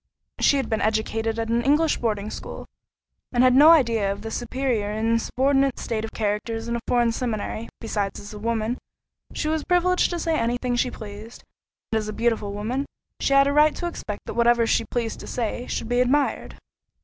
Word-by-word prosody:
She 285 - +4
had 265 -4 -1
been 220 - -1
educated 220 +1 0
at 225 0 -2
an 235 +1 +2
English 295 +5 +3
boarding 215 -2 -2
school, - - -7 0.7
and 245 0 +3
had 255 -1 +6
no 290 +5 +8
idea 230 -11 +4
of 200 - -6
the 225 - -5
superior 245 -4 -1
and 225 +2 +1
subordinate 270 +1 +1
state 220 -2 -3
of 225 - -5
characters 225 +2 -2
in 235 - -1
a - - -1
foreign 240 -1 +3
seminary—besides, 220 -3 -3
as 205 +1 -10
a 210 - -8
woman, 230 +2 -1 0.6
she - - -2
was 315 -1 0
privileged 360 0 +2
to 350 - -2
say 330 -1 0
any 235 +1 0
thing 245 0 -1
she 250 +1 +1
pleased; 215 +1 -10 0.5
and 220 - +2
as 215 - -5
a 215 - -4
beautiful 225 -3 0
woman, 230 +7 -3 0.3
she 275 - +1
had 275 0 +6
a 280 - +1
right 300 +1 +5
to 350 - -4
expect 215 -11 -5
that - - -5
whatever 235 0 +3
she 225 - +1
pleased 230 -2 -3
to - - -9
say, 240 +1 -3
should - - -3
be 245 +1 +2
admired. 275 +3 0
235 Hz, 200 wpm, -24 LUFS, 220-265 Hz, 0.7 s, no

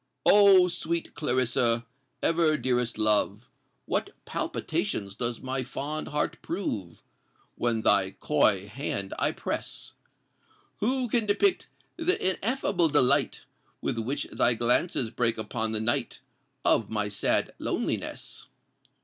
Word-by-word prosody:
Oh! 195 -3 +7
sweet 170 -1 -3
Clarissa—ever 130 +4 0
dearest 125 -4 0
love! 105 0 +2 0.4
What - - -1 0.2
palpitations 100 -2 -2
does 120 +2 -3
my 130 0 -2
fond 145 +4 -4
heart 150 0 -2
prove 110 - -4 0.5
When 115 -2 -1
thy 100 -2 +4
coy 110 -10 +2
hand 100 -4 -3
I - - +2
press! - - -5 0.9
Who 255 +3 0
can 230 -1 +1
depict 360 - +2 0.3
th' 340 +3 +2
ineffable 190 -3 0
delight 145 -4 +2 0.4
With 115 - -2
which 135 +6 -2
thy 120 - +3
glances 120 +1 +1
break 120 -1 0
upon 110 0 -3
the 110 - -1
night 115 +2 -1 0.4
Of - - +3
my 105 -2 -1
sad 100 -1 0
loneliness? - - -3
125 Hz, 115 wpm, -27 LUFS, 110-170 Hz, 0.9 s, Oh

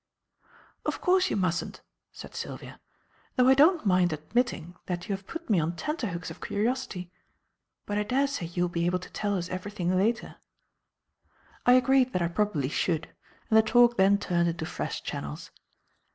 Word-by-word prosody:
"Of - - -2
course 370 +1 +3
you - - -1
mustn't," 180 -4 -2 0.3
said - - -11
Sylvia; - - -7 0.6
"though 250 0 +4
I 265 - +8
don't 310 +2 +4
mind 180 -2 +3
admitting 175 - -2
that 175 -1 -3
you 200 - 0
have 195 0 -12
put 335 0 -7
me 205 -6 +3
on 165 +2 -1
tenterhooks 185 - -3
of - - -11
curiosity. 205 -5 -2 0.7
But 205 0 -1
I - - +1
daresay 265 -4 0
you 175 +1 -1
will 175 - 0
be 170 0 -1
able 180 +1 +1
to 180 - -11
tell 205 -2 -1
us 175 -1 -3
everything 185 -1 -2
later." 220 +5 0 1.3
I 245 - +8
agreed 255 0 +4
that 180 - 0
I 170 - 0
probably 175 -7 0
should; 160 0 -1 0.4
and - - +4
the - - +8
talk 240 +2 +4
then 195 +1 +5
turned 175 -4 +1
into 165 -1 -4
fresh - - -4
channels. 75 0 -6
195 Hz, 170 wpm, -28 LUFS, 175-240 Hz, 1.3 s, I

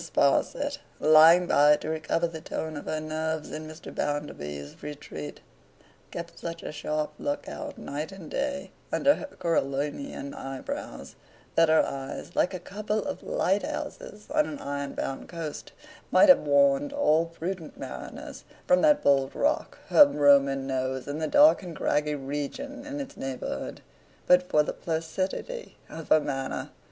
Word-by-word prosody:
SPARSIT, 140 -4 +1 0.2
lying 160 +3 +7
by 150 -3 +6
to 150 - -7
recover 160 +2 0
the 165 -2 -5
tone 160 0 -4
of 145 - -7
her 155 - -2
nerves 155 0 -3
in 155 0 -6
Mr. 155 +1 -10
Bounderby's 75 - -4
retreat, 140 - -7 0.7
kept - - -7
such 165 0 -6
a - - -5
sharp 150 0 -2
look 285 0 -3
out, 295 -1 -6
night 150 +5 -5
and 190 -5 -10
day, 280 0 -2 0.2
under 285 - +4
her 295 - -6
Coriolanian 145 - -2
eyebrows, 135 -1 -6 0.4
that 165 -1 +4
her 160 - +5
eyes, 135 0 -6
like - - +2
a - - -4
couple 210 +3 -3
of - - -4
lighthouses 205 +2 -2
on 305 0 +3
an 295 - -5
iron 140 - -4
bound 135 - -4
coast, 165 -3 -6 0.4
might 300 - +6
have 275 - +9
warned 280 0 +3
all 165 - +3
prudent 165 0 -6
mariners - - -8 0.2
from 270 - +4
that 300 -1 +4
bold 135 -1 +3
rock 305 +3 0
her 295 - +9
Roman 140 - +4
nose 130 -1 -2
and 145 +2 -4
the 155 - 0
dark 295 - +6
and 175 -4 -8
craggy 150 0 0
region 150 - -5
in 290 0 -5
its 275 -2 -6
neighbourhood, 135 -1 -5 0.4
but 180 0 +4
for 150 - +4
the - - -3
placidity 185 - -4
of 165 -1 -8
her 155 - +7
manner. 135 -3 -4
160 Hz, 155 wpm, -27 LUFS, 145-205 Hz, 0.7 s, have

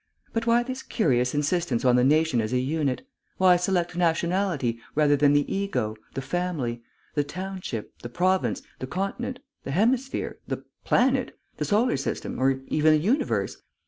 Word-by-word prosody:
But 230 0 -1
why 235 +1 +4
this 260 +1 -5
curious 125 - +1
insistence 145 -4 0
on 125 -1 +5
the 125 - +4
nation 150 -2 +3
as 110 +2 -3
a - - +3
unit? 140 - -1 0.3
Why 185 -1 +6
select 175 -1 0
nationality, 170 -7 +1 0.2
rather 150 -1 +4
than 145 0 +4
the 145 -1 +3
ego, 195 - -1 0.2
the 135 - -3
family, 135 -7 -2 0.3
the 145 - +1
township, 180 - -6
the 120 - -7
province, 185 - +1 0.2
the 130 - -4
continent, 195 - -3 0.2
the - - -6
hemisphere, 240 - 0
the - - -4 0.2
planet, 255 0 +2 0.2
the 150 - -1
solar 210 - +2
system, 135 - -3
or 135 0 +2
even 155 +2 +3
the - - +5
universe? 215 - 0
160 Hz, 160 wpm, -26 LUFS, 135-195 Hz, 0.3 s, Why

